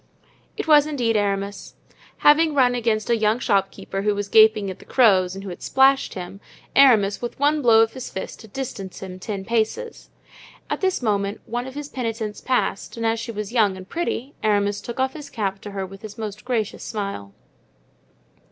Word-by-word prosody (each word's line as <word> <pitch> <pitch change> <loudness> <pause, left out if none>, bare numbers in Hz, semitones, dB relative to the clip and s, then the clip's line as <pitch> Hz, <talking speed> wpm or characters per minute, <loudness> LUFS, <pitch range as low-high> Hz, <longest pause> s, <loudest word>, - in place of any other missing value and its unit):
It - - -4
was 300 -1 +6
indeed 245 -7 0
Aramis. 200 -1 -2 0.4
Having 305 +1 +4
run 250 -3 +4
against 225 -2 0
a - - +5
young 215 0 +2
shopkeeper 195 -3 -1
who 210 0 +1
was 200 0 -4
gaping 215 -2 +5
at 185 - -10
the - - -13
crows 190 -7 +3
and 195 - -7
who 195 - -6
had 175 - -9
splashed 270 +1 +3
him, 185 +2 -7 0.3
Aramis 220 -8 +5
with 240 - -5
one 295 +2 +2
blow 230 -3 +6
of 225 0 +1
his 260 -1 -7
fist 190 - -7
had 220 - -14
distanced 200 -8 -6
him 185 -1 -8
ten 195 0 -5
paces. 235 - -2 0.6
At - - -2
this 375 -8 0
moment 200 -2 -1
one 240 +2 -4
of 265 - -9
his 290 -1 -5
penitents 225 -4 -4
passed, 250 -4 -1
and 230 - -2
as 225 0 +1
she 230 +1 -5
was 210 0 -5
young 210 -6 +3
and 185 0 -10
pretty 285 -3 -3
Aramis 205 -1 +1
took 235 +1 -7
off 265 0 +1
his 300 -2 -9
cap 195 -4 -3
to 205 - -8
her 195 -1 -4
with 195 +1 -12
his 215 0 -9
most 210 -1 -6
gracious 230 -5 -2
smile. 200 - -5
220 Hz, 195 wpm, -23 LUFS, 200-250 Hz, 0.6 s, was